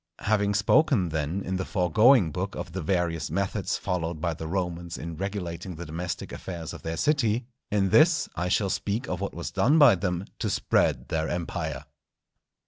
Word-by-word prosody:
Having 100 -1 +1
spoken, 105 - +3
then, 80 +5 -2
in 95 +1 -2
the 95 - -2
foregoing 95 - +4
Book - - -3
of - - -6
the 95 +2 -4
various 85 -1 -1
methods 95 +4 -1
followed 85 -3 -2
by 85 +1 -1
the 80 0 -6
Romans 85 -1 -3
in 85 0 -6
regulating 95 -2 -4
the 85 +2 -7
domestic 85 +3 -5
affairs 85 -4 -6
of - - -9
their 80 0 -4
city, 125 -6 +1 0.2
in 100 -2 +1
this 155 - +5
I 90 - -1
shall 100 +1 +1
speak 105 +5 -2
of 90 +1 -3
what 100 - -3
was 85 - -5
done 120 +11 +3
by 145 -7 +8
them 90 -1 -2
to - - -1
spread - - +1
their 80 0 -1
Empire. 85 -1 -3
90 Hz, 180 wpm, -27 LUFS, 85-100 Hz, 0.2 s, by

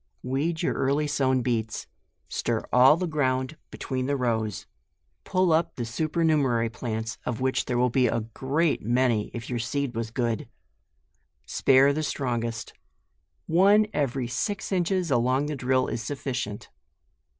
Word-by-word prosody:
Weed 155 +7 -1
your - - +1
early 140 +3 +1
sown 130 -3 +1
beets; 115 -3 -2 0.4
stir 115 -2 -1
all 130 +5 +7
the 180 - -1
ground 130 -3 0
between 130 -1 -3
the 140 - +1
rows; 110 -4 -1 0.6
pull 185 -3 +2
up 165 +1 +1
the 120 - -3
super* 155 +8 -1
numerary 130 -8 +2
plants, 110 -1 -4
of 120 -3 -3
which 130 0 0
there 125 - -1
will 125 0 +2
be 125 0 +3
a 115 - 0
great 135 +8 -1
many 120 -1 +1
if 115 -1 -6
your 120 -2 -2
seed 135 +3 -2
was 115 -1 -3
good; 115 -2 -2 1.0
spare 135 - +4
the 155 - -1
strongest. 120 -6 -3 0.7
One 200 +6 +5
every 135 -3 -1
six 200 - -3
inches 180 -2 0
along 130 +3 +2
the 150 0 -3
drill 130 0 +1
is 115 - -3
sufficient. 125 -4 -4
130 Hz, 150 wpm, -26 LUFS, 120-150 Hz, 1.0 s, all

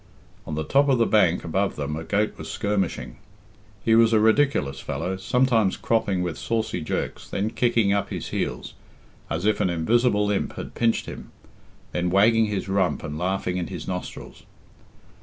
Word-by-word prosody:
On 75 - -3
the 80 - -2
top 140 - +3
of 130 - +4
the 115 - +3
bank 95 -6 +3
above 95 +4 -1
them 75 +1 -3
a 80 - -5
goat 105 +5 0
was 80 0 -8
skirmishing. 95 - -2 0.7
He 115 - +4
was 115 0 +5
a 110 - +5
ridiculous 110 - +2
fellow; 95 - -3
sometimes 115 0 +2
cropping 100 -5 0
with 85 -3 -4
saucy 110 -6 -2
jerks, 75 - -4
then 105 +3 -1
kicking 115 -5 +2
up 100 - 0
his - - -5
heels, - - -3 0.6
as 85 +4 -2
if 110 -1 +2
an - - +2
invisible 105 +4 +2
imp 100 - -1
had - - -7
pinched 115 -1 +1
him, - - -9 0.6
then 90 0 -1
wagging 110 +4 +4
his 100 -2 -3
rump 95 -1 0
and 75 +1 -5
laughing 90 0 -1
in 90 - -2
his 90 -4 -7
nostrils. 90 -1 -6
100 Hz, 175 wpm, -24 LUFS, 90-110 Hz, 0.7 s, was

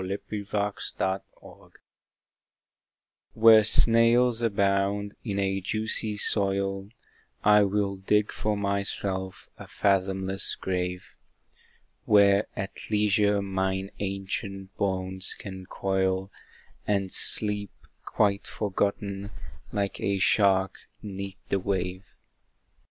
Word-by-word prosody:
The 95 +2 -3
Joyous 105 -1 -5 0.4
Defunct 95 0 -6 1.6
Where 110 -1 +7
snails 115 +2 +4
abound 100 -1 0
in 100 -4 -4
a 95 0 -1
juicy 110 +1 0
soil, 100 -1 +1 0.5
I 105 0 +6
will 100 -1 0
dig 105 +2 +1
for 105 -1 -2
myself 100 -1 -3
a - - -10
fathomless 95 0 0
grave, 90 -1 -3 1.0
Where 100 0 +4
at 95 0 -6
leisure 105 -1 +2
mine 95 0 -2
ancient 95 0 -5
bones 95 -1 -1
I - - -10
can 95 -2 -8
coil, 95 0 -1 0.6
And 100 -2 0
sleep 105 -1 +4 0.3
quite 100 -1 0
forgotten 100 -1 -3 0.4
like 100 -1 -2
a 100 0 0
shark 95 -1 +2 0.2
'neath 100 -2 -7
the 100 - +1
wave. 95 0 -3
100 Hz, 95 wpm, -26 LUFS, 95-105 Hz, 1.6 s, Where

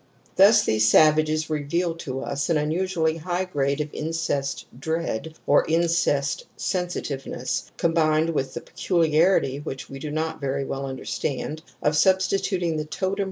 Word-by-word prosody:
^ - - -35
Thus 210 +2 +7
these 110 0 +3
savages 155 +2 +4
reveal 160 +3 -1
to 135 -5 -5
us 140 +3 -2
an 165 - +3
unusually 160 +1 0
high 175 +3 -2
grade 140 -5 -1
of 150 0 -3
incest 155 -4 -2
dread 160 -1 -3
or 145 - +4
incest 165 - +1
sensitiveness, 175 -7 -3
combined 160 -1 +2
with 135 -4 -2
the - - -4
peculiarity, 165 -4 +2
which 135 -2 -7
we 135 - -7
do 150 - -5
not 155 +1 -3
very 140 0 -1
well 135 0 -4
understand, 135 +3 -4 0.2
of 150 +1 +2
substituting 185 -1 +2
the 155 - -2
totem 190 +5 -2
155 Hz, 145 wpm, -24 LUFS, 140-170 Hz, 0.2 s, Thus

